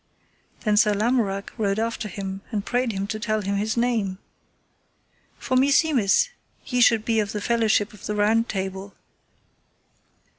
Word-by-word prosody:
Then 210 -1 +1
Sir 210 -1 +4
Lamorak 210 -3 0
rode 200 -2 0
after 225 -1 -2
him, 195 0 -6
and 210 -3 -3
prayed 245 -1 0
him 195 -1 -3
to 215 +2 -4
tell 215 0 -1
him 200 0 -2
his 220 +3 -1
name: 225 -6 0 1.2
For 260 - -2
meseemeth 280 - +3 0.4
ye 250 -1 0
should 225 -2 +4
be 225 -1 +1
of 205 -2 -2
the 210 - -2
fellowship 220 -1 +1
of 210 - -10
the 210 - -2
Round 220 +3 +2
Table. 190 0 -4
215 Hz, 150 wpm, -24 LUFS, 200-235 Hz, 1.2 s, Sir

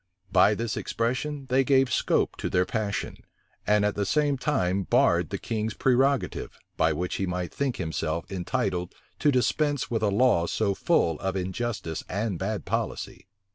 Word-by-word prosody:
By 95 +3 +5
this 115 +1 -2
expression 135 +5 -2
they 130 +2 +4
gave 135 -2 +3
scope - - +1
to - - -3
their 90 0 +2
passion, 105 0 -3 0.5
and 105 0 +4
at 105 - +1
the 100 - -1
same 145 +7 +2
time 100 -9 0
barred 95 - +2
the - - -3
king's 110 -1 -3
prerogative, 135 +2 +1 0.2
by 80 0 +3
which 90 +4 -2
he 95 - -1
might 90 -1 -3
think 140 -3 -1
himself 80 0 -2
entitled 90 -1 -2 0.2
to 150 - +4
dispense 145 +2 +1
with 115 - 0
a 105 - +2
law 100 -5 +3
so 100 +1 0
full 80 -4 +1
of 95 -1 -2
injustice 95 -2 -3
and 100 -2 -2
bad 105 +2 -3
policy. - - -3
105 Hz, 165 wpm, -27 LUFS, 90-130 Hz, 0.5 s, By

